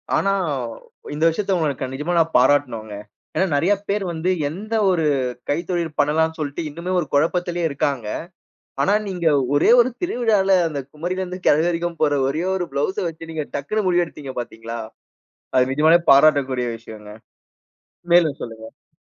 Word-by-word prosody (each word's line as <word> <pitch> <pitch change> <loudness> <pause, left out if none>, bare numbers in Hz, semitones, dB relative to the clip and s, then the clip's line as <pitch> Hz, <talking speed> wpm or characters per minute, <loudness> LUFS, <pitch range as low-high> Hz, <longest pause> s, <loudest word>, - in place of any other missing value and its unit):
ஆனா, 195 - +2 0.8
இந்த 155 +2 -2
விஷயத்தை 195 +4 -1
உங்களுக்கு 140 -5 -1
நிஜமா 150 +6 -2
நான் 165 0 +1
பாராட்டணும்ங்க. 125 -6 +1 0.4
ஏன்னா, 190 - +2
நெறைய 175 +8 +3 0.2
பேரு 200 0 0
வந்து 170 +2 -2 0.2
எந்த 215 +8 -5 0.2
ஒரு 165 -3 +1 0.4
கைத்தொழில் 170 0 -2
பண்ணலாம்னு 160 +2 +2
சொல்லிட்டு 145 +1 -4
இன்னுமே 170 +5 -5
ஒரு 155 - -3
குழப்பத்திலேயே 175 +3 +1
இருக்காங்க. 135 -5 -2 0.8
ஆனா, 200 - +3
நீங்க 180 -3 -3 0.3
ஒரே 150 - +4
ஒரு 245 +2 +3
திருவிழால 215 - +2
அந்தக் 140 -3 -6
குமரியிலிருந்து 180 +3 -4
கிழவி 155 +3 +4
வரைக்கும் 170 -1 -2
போட்ற 145 -2 +2
ஒரே 155 +5 -2
ஒரு 180 -2 -2
பிளவுஸ 145 +7 -1
வச்சு 165 0 -9
நீங்க 155 -2 -3
டக்குன்னு 200 +9 -2
முடிவு 175 -1 +3
எடுத்தீங்க, 140 -4 -9
பார்த்தீங்களா? 115 0 -7 0.8
அது 130 +1 +3
நிஜமாலே 160 +4 +5
பாராட்டக்கூடிய 135 -4 +4
விஷயங்க. 110 -2 -11 1.0
மேலும் 160 -5 +4
சொல்லுங்க. 115 -1 -12
160 Hz, 140 wpm, -21 LUFS, 140-175 Hz, 1.0 s, நிஜமாலே